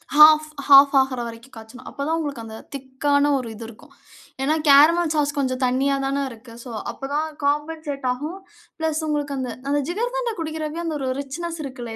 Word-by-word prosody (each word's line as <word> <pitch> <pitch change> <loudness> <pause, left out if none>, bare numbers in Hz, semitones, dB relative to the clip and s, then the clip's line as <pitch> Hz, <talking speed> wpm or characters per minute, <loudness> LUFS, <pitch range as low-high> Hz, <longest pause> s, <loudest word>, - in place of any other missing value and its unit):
Half, 310 0 +8 0.2
half 280 0 +8
ஆகுற 265 -2 0
வரைக்கும் 230 +3 -11
காய்ச்சணும், 225 +3 -12
அப்ப 280 - -8
தான் 325 +1 +1
உங்களுக்கு 285 -7 -4
அந்த 220 0 -9 0.2
திக்கான 285 +2 0
ஒரு 250 - -4
இது 225 - -9
இருக்கும். 230 -1 -15 0.5
ஏன்னா 305 +3 +2
கேரமல் 315 +4 +6
சாஸ் 290 -1 +1
கொஞ்சம் 255 -2 -1
தண்ணியா 265 +2 +1
தானே 275 +1 -1
இருக்கு. 230 0 -13
சோ, 250 - -10 0.2
அப்ப 270 - -8
தான் 310 +2 0 0.2
காம்பன்சேட் 295 -1 -2
ஆகும். 300 +8 -4 0.4
பிளஸ் 320 -1 -1
உங்களுக்கு 290 -1 -2
அந்த 255 -2 -3 0.2
அந்த 290 0 +2
ஜிகர்தண்டா 480 +5 -2
குடிக்கிற 315 -1 -4 0.2
அந்த 320 - -2
ஒரு 265 - -3
ரிச்னெஸ் 330 +5 -5
இருக்குல்ல. 245 -4 -7
285 Hz, 175 wpm, -22 LUFS, 260-310 Hz, 0.5 s, Half